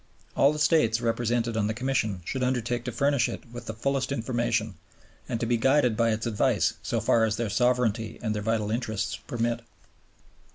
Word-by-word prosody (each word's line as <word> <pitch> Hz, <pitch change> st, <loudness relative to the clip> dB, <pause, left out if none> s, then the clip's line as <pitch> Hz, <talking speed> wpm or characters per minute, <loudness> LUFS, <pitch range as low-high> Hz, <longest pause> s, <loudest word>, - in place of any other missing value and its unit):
All 140 Hz, -, +5 dB
the 150 Hz, -, -4 dB
States 150 Hz, -7 st, +3 dB
represented 115 Hz, 0 st, 0 dB
on 105 Hz, -2 st, +1 dB
the 110 Hz, -, -2 dB
Commission 115 Hz, -7 st, -1 dB
should 130 Hz, -, -3 dB
undertake 125 Hz, -1 st, -1 dB
to 125 Hz, -, -2 dB
furnish 140 Hz, +1 st, +2 dB
it -, -, -6 dB
with 120 Hz, -1 st, -9 dB
the 110 Hz, -, -3 dB
fullest 135 Hz, +3 st, -1 dB
information, 120 Hz, -3 st, -1 dB, 0.6 s
and 120 Hz, -3 st, -1 dB
to 115 Hz, -, -1 dB
be 120 Hz, +1 st, +1 dB
guided 130 Hz, -1 st, +3 dB
by 115 Hz, +1 st, +2 dB
its 110 Hz, 0 st, -1 dB
advice 110 Hz, -3 st, +1 dB
so -, -, -1 dB
far 115 Hz, -, +3 dB
as 110 Hz, -1 st, +1 dB
their 115 Hz, -3 st, -2 dB
sovereignty 120 Hz, -3 st, +1 dB
and 110 Hz, -3 st, -2 dB
their 105 Hz, -, -3 dB
vital 110 Hz, -1 st, 0 dB
interests 110 Hz, -3 st, -2 dB
permit. 120 Hz, 0 st, -1 dB
115 Hz, 190 wpm, -27 LUFS, 110-125 Hz, 0.6 s, All